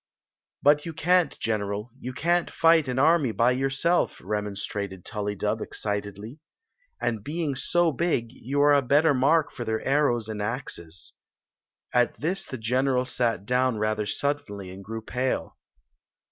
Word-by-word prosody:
" - - -44
But 145 +1 +5
you 165 - -6
can't, 180 +3 +2
general; 105 +1 -2
you 130 - -5
can 170 +6 +1
t - - -10
fight 165 -2 +4
an 125 0 -2
army 150 -2 +4
by 115 +3 +3
yourself!" 135 +7 +1
remonstrated 100 -2 -4
TuUydub, 105 -2 -2
excitedly. 105 +5 -4 0.6
"And 115 -4 -2
being 155 +1 -2
so 170 +5 +2
big, 135 -7 -1
you 135 +3 -2
are 145 0 +6
a 140 - +5
better 145 +4 +4
mark 145 +4 +3
for 120 - -6
their 110 -1 -2
arrows 135 -5 +2
and 110 -1 -4
axes." 100 - -5 0.8
At 120 0 +2
this 180 +6 -2
the 130 - -5
general 125 +3 +1
sat 120 -6 -1
down 125 0 +1
rather 110 0 -1
suddenly 105 -11 -2
and 95 +1 -10
grew 110 +2 -6
pale. 125 +3 -2
125 Hz, 150 wpm, -26 LUFS, 105-145 Hz, 0.8 s, are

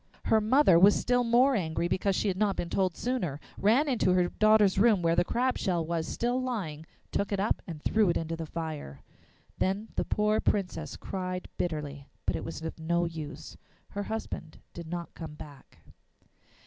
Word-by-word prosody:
Her 220 - +4
mother 215 - +5
was 200 +3 +7
still 245 0 +2
more 245 +4 +4
angry 170 -5 0
because 190 +2 0
she 210 - 0
had 190 - +1
not 200 0 +1
been 170 - -4
told 185 -3 0
sooner, 200 - -2 0.2
ran 235 +9 +3
into 235 -9 +2
her 180 -1 +3
daughter's 215 -3 +4
room 210 -4 +4
where 165 0 +3
the 175 - +4
crab 250 +7 0
shell 175 -5 0
was 165 -1 -2
still 245 +2 -1
lying, 175 -12 -4 0.2
took 200 - -1
it 200 - 0
up 205 - +1
and 160 -4 -7
threw 215 -3 +3
it 170 - +2
into 165 0 -3
the 165 -1 -6
fire. 155 - -6 0.6
Then 200 +4 0
the - - +2
poor 210 +1 +1
Princess 170 -7 -1
cried 185 -1 -4
bitterly, 145 -4 -4 0.2
but - - +1
it - - -3
was 165 0 -6
of 160 0 -5
no 170 +2 +1
use; 160 -3 -7 0.3
her 205 - -4
husband 220 -7 -5 0.2
did 170 -1 -8
not 170 0 -5
come 160 -3 -8
back. 145 -2 -13
185 Hz, 185 wpm, -29 LUFS, 165-215 Hz, 0.6 s, was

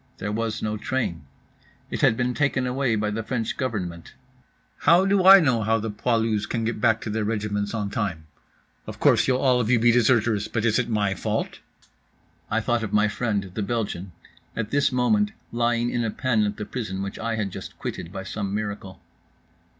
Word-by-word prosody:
There 105 +2 -4
was 115 0 -2
no 110 0 -1
train. 120 -8 -3 0.7
It - - -3
had 110 - +4
been 125 0 0
taken 135 -1 +1
away 125 -2 0
by 105 0 -1
the 110 +2 -2
French 115 0 -3
Government. 90 -10 -4 0.6
"How 170 +5 +5
do 195 -1 +3
I 195 +1 +11
know 130 -9 +2
how 110 +1 +2
the 110 0 -3
poilus 110 -1 0
can 115 - -2
get 115 -2 -2
back 110 -1 +3
to 110 - -4
their 110 0 -1
regiments 105 -1 -2
on 105 -2 -3
time? 95 -8 -3 0.6
Of - - -8
course - - +4
you'll 130 - +3
all 130 -2 +3
of 115 - -2
you 125 - +5
be 120 +1 +4
deserters, 115 -3 +2
but 115 -1 -2
is 115 0 +3
it 125 - -1
my 105 -3 +1
fault?" - - -3 0.9
(I 110 +1 +1
thought 120 +1 0
of 110 -3 -4
my 105 0 +3
friend, 105 -4 -2
the 105 - -3
Belgian, 100 -4 -3 0.4
at 110 -1 -3
this 140 0 +2
moment 210 +13 +2 0.2
lying 120 0 +1
in 120 - 0
a 115 - 0
pen 115 -2 +1
at 105 0 -3
the 105 - -4
prison 100 -6 -4
which 100 - -6
I 115 0 -2
had 105 -3 -2
just - - -9
quitted 85 - -6
by 95 -1 -6
some 100 +1 -4
miracle.) 100 -3 -5
110 Hz, 200 wpm, -24 LUFS, 105-120 Hz, 0.9 s, I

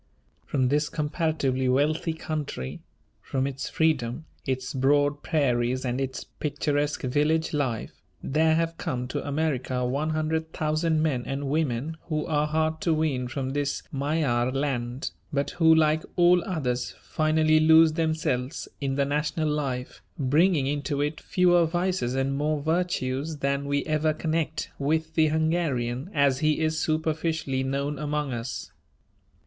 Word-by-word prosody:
From 130 -3 +1
this 150 +2 +1
comparatively 150 -4 0
wealthy 150 +5 +1
country; 155 - -4 0.4
from 135 -1 -1
its 135 -1 -4
freedom, 155 -3 0 0.2
its 130 -1 -2
broad 145 +2 +2
prairies 130 -5 +1
and 125 +1 -1
its 130 -1 -3
picturesque 145 0 -2
village 150 +5 +1
life, 130 -7 -2 0.2
there 160 +3 +3
have 165 0 -1
come 125 0 -2
to - - -3
America 140 -4 -1
one 140 +5 -1
hundred 160 +1 -1
thousand 155 +1 +1
men 140 -6 +1
and 135 0 -3
women 150 0 -1
who 155 -2 -2
are 150 -2 +1
hard 160 +1 0
to 165 -2 +2
wean 145 -5 0
from 130 +1 -3
this 145 0 -1
Magyar 135 -4 0
land, 130 -2 -2 0.2
but 140 -1 -1
who, 160 -2 +5
like 155 0 +3
all 175 0 +5
others, 130 -9 -2
finally 155 0 +3
lose 160 0 +6
themselves 155 -4 -1
in 135 -1 -1
the 140 0 +2
national 150 +2 0
life, 135 -4 -3 0.2
bringing 150 +2 +3
into 145 0 -1
it 150 +2 -2
fewer 175 -2 +3
vices 175 -6 -1
and 135 +1 0
more 150 +1 0
virtues 155 -2 -1
than 140 0 -1
we 140 0 0
ever 155 0 +1
connect 160 -1 -2
with 160 +3 0
the 160 -1 +4
Hungarian 155 -4 0
as 140 -5 +2
he 155 0 +2
is 160 0 0
superficially 160 -3 -1
known 140 +2 -2
among 150 -2 -2
us. 120 +1 -5
150 Hz, 145 wpm, -26 LUFS, 135-160 Hz, 0.4 s, lose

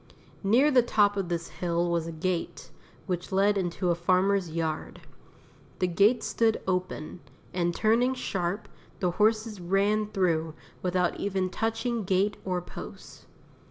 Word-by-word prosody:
Near 245 +9 +4
the 255 -2 +6
top 205 -3 +3
of 195 -3 -2
this 170 -1 -3
hill 170 -1 -1
was 170 -1 0
a - - -4
gate, 170 +2 -3 0.3
which 180 -1 -3
led 200 +2 +3
into 180 -1 0
a - - +4
farmer's 185 +2 +2
yard. 160 -1 -3 0.8
The - - +1
gate 200 +7 +3
stood 225 -1 +1
open, 180 -3 -2 0.3
and 175 -1 0
turning 235 +4 +3
sharp, 195 -4 -2 0.3
the 180 -3 +1
horses 215 +1 +1
ran 200 +4 +1
through 165 -6 0 0.3
without 180 -1 0
even 190 -2 -1
touching 225 +1 -1
gate 195 +2 +1
or 180 -2 -2
post. - - -10
190 Hz, 140 wpm, -28 LUFS, 175-210 Hz, 0.8 s, the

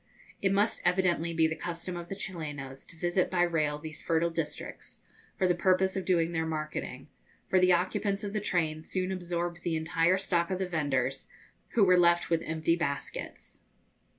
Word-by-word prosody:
It 195 - +2
must 205 +2 +2
evidently 175 -2 +2
be 165 -1 +3
the 160 0 0
custom 175 +2 -5
of 175 0 -7
the 195 - -4
Chilenos 145 -8 -6
to - - -12
visit 175 +2 +1
by 175 -1 +2
rail 155 -4 +1
these 155 0 -8
fertile 165 +1 +1
districts, 160 -2 -5 0.4
for 185 - +2
the 180 - +4
purpose 185 +2 +2
of 190 - -2
doing 170 -2 +2
their 160 -1 -1
marketing; 155 -1 -4 0.4
for 185 - +4
the 185 0 +5
occupants 195 +3 0
of 205 -1 -4
the 215 - -1
train 160 -6 0
soon 185 +3 -2
absorbed 175 -1 -2
the 170 -2 -1
entire 165 +3 +2
stock 175 -3 0
of 185 - -1
the 190 - -1
vendors, 140 -6 -1 0.5
who 225 - +5
were 180 -2 +6
left 170 0 +4
with 165 -1 +3
empty 160 +1 0
baskets. 140 -4 -5
170 Hz, 180 wpm, -30 LUFS, 160-185 Hz, 0.5 s, were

